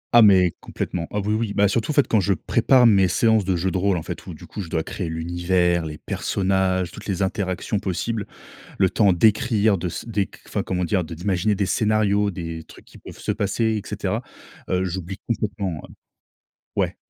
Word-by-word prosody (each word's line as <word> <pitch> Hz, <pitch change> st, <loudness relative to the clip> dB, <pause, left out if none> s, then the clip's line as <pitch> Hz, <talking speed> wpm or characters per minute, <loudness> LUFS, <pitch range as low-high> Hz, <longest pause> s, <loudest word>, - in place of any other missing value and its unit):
Ah, 120 Hz, -, +9 dB
mais 95 Hz, -5 st, +6 dB
complètement. 85 Hz, -2 st, -4 dB
Ah 105 Hz, -, -1 dB
oui, 105 Hz, +2 st, -1 dB
oui, 110 Hz, -2 st, -1 dB
bah 105 Hz, 0 st, +4 dB
surtout, 110 Hz, +6 st, -1 dB
en -, -, +1 dB
fait, 145 Hz, -, +4 dB
quand 110 Hz, -, +3 dB
je 100 Hz, +1 st, +2 dB
prépare 125 Hz, +9 st, +3 dB
mes 100 Hz, -5 st, +5 dB
séances 110 Hz, -1 st, +3 dB
de 95 Hz, -, +1 dB
jeu 90 Hz, +2 st, 0 dB
de 95 Hz, -, -1 dB
rôle, 95 Hz, -1 st, +2 dB
en 80 Hz, -, -4 dB
fait, -, -, -7 dB
où, -, -, -7 dB
du -, -, -12 dB
coup, 105 Hz, -, -7 dB
je 85 Hz, -, -7 dB
dois 80 Hz, -1 st, -1 dB
créer 90 Hz, -1 st, -4 dB
l'univers, 85 Hz, +1 st, 0 dB
les 75 Hz, -1 st, -7 dB
personnages, 95 Hz, -2 st, 0 dB
toutes 105 Hz, -, -10 dB
les 95 Hz, -1 st, 0 dB
interactions 95 Hz, +1 st, -2 dB
possibles, 100 Hz, +4 st, -3 dB, 0.5 s
le 95 Hz, -, +4 dB
temps 100 Hz, 0 st, +3 dB
d'écrire, 110 Hz, +2 st, +3 dB
de 90 Hz, 0 st, -3 dB
s 85 Hz, -, -6 dB
d'éc 100 Hz, -5 st, -2 dB
enfin, -, -, -2 dB
comment 90 Hz, -1 st, -2 dB
dire? 90 Hz, +1 st, +1 dB
De 80 Hz, +1 st, -7 dB
d'imaginer 95 Hz, +4 st, 0 dB
des 100 Hz, -1 st, 0 dB
scénarios, 105 Hz, 0 st, +2 dB
des 85 Hz, -3 st, -6 dB
trucs -, -, -16 dB
qui -, -, -17 dB
peuvent -, -, -12 dB
se -, -, -1 dB
passer, 105 Hz, +3 st, -1 dB, 0.2 s
et -, -, -14 dB
cetera, -, -, -2 dB, 0.5 s
heu, 90 Hz, 0 st, +1 dB
j'oublie 95 Hz, +1 st, -4 dB
complètement, 100 Hz, -7 st, -2 dB
ouais. -, -, -11 dB, 0.9 s
Ouais. -, -, 0 dB
95 Hz, 210 wpm, -23 LUFS, 90-105 Hz, 0.9 s, Ah